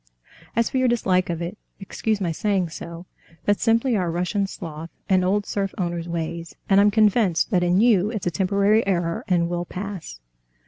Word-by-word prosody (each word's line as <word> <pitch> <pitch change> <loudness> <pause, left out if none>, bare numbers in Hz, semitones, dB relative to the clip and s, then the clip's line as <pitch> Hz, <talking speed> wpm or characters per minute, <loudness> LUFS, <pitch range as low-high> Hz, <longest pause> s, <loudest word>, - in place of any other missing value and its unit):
"As 230 0 +2
for 260 - 0
your 255 - +3
dislike 185 -7 +1
of 170 0 -2
it, 175 +5 -6 0.2
excuse 210 +2 -2
my 180 -4 -1
saying 190 0 0
so, 170 +2 -8 0.4
that's 205 0 +2
simply 230 +2 +2
our 180 -4 0
Russian 180 +4 -1
sloth 165 -3 -8 0.2
and 185 -1 +3
old 200 +2 +1
serf 195 -1 -3
owner's 175 -2 -3
ways, 170 0 -4
and 195 0 +5
I'm 205 - +5
convinced 210 -4 +2
that 180 -3 +3
in 175 +1 +2
you 210 -4 +4
it's 215 -4 -4
a 175 - +1
temporary 200 +5 +2
error 170 -3 0
and 175 -2 +2
will 175 0 -3
pass." 185 - -7
185 Hz, 185 wpm, -23 LUFS, 170-205 Hz, 0.4 s, and